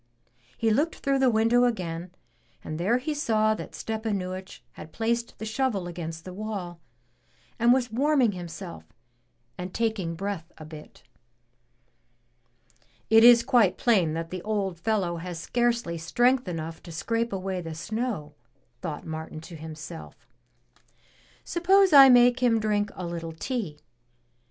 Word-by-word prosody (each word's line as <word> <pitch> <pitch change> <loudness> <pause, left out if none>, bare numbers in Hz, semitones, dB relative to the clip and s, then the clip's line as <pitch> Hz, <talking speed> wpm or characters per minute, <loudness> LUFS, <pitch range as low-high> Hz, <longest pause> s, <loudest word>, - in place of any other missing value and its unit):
'* 120 0 -39
He 225 -1 +1
looked 300 +9 +1
through 275 -1 0
the 265 -1 +4
window 230 +2 +3
again, 180 -7 -2 0.5
and 155 +1 -5
there 200 +8 +2
he 295 +5 -3
saw 215 -7 +2
that - - -8
Stepanuich 195 -4 -4
had 155 - -11
placed 235 +3 -2
the 220 - -6
shovel 220 -4 -1
against 165 -2 -6
the 185 - -7
wall, 195 -4 -5 0.8
and 235 +1 +5
was 245 -2 +2
warming 270 -1 +3
himself 175 0 -8 0.8
and 180 +1 -6
taking 220 -7 -1
breath 185 -2 -5
a 155 - -10
bit. 155 -1 -12 2.1
'It 225 0 +7
is 235 -1 +8
quite 230 -6 +3
plain 190 -10 +2
that 165 +1 -4
the 185 -1 -5
old 195 -4 -2
fellow 185 -4 0
has 175 0 -6
scarcely 235 -4 0
strength 240 +9 +2
enough 165 -2 -5
to 170 - -11
scrape 230 +9 -1
away 190 -1 -3
the 165 -2 -7
snow," 210 - -4 0.5
thought 160 -5 -5
Martin 160 0 -6
to 165 +1 -11
himself, 150 - -9 1.2
Suppose 375 +1 +3
I 275 -2 +10
make 245 0 +6
him 240 -3 +3
drink 210 -1 0
a 185 - -5
little 165 -1 -5
tea! 190 - -4
205 Hz, 140 wpm, -26 LUFS, 170-235 Hz, 2.1 s, I